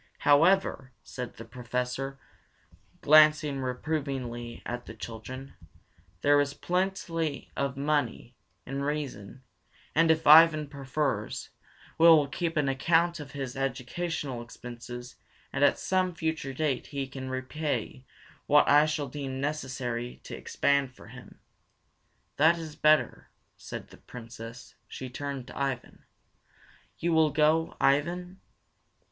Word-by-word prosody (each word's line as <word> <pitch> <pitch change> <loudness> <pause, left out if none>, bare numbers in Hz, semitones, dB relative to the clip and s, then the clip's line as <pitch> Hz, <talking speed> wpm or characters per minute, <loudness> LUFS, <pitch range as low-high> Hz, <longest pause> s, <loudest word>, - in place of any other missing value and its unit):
"However," 145 -3 +3
said 125 -2 -7
the 115 - -9
Professor, 125 +2 -4 0.8
glancing 150 -2 +5
reprovingly 125 -3 -4
at 120 0 -5
the 115 - -8
children, 125 +5 -8 0.7
"there 145 0 +5
is 145 0 -2
plenty 175 -5 -2
of 140 -1 -2
money, 140 -4 -1 0.3
in 135 +2 -4
reason, 140 -5 -4 0.5
and 165 +1 +4
if 160 0 +3
Ivan 155 0 +8
prefers, 135 -5 -3 0.5
we 165 - +7
will 155 -3 +7
keep 165 +2 -3
an 145 -2 +2
account 165 +5 +2
of 145 -2 -9
his 135 -3 -5
educational 135 +1 -3
expenses, 120 +1 -9 0.4
and - - +1
at - - +5
some 185 -2 0
future 160 -4 -2
date 135 -2 -1
he 140 -2 -3
can 130 0 -7
repay 130 +1 -3 0.4
what 150 0 +5
I 150 +1 +6
shall 150 -2 -2
deem 135 -1 -5
necessary 130 -4 -3
to - - -7
expend 140 -2 0
for - - -14
him." 125 +1 -13 1.0
"That 160 +4 +5
is 160 -2 -7
better," 155 0 +2 0.3
said - - -8
the - - -15
Princess. 115 0 -10
She 130 -1 -7
turned 140 -1 -5
to - - -12
Ivan. 135 -3 -4 0.9
"You 170 0 0
will 160 -1 +5
go, 155 +2 +2
Ivan." 175 +7 +1
140 Hz, 125 wpm, -28 LUFS, 125-155 Hz, 1.0 s, Ivan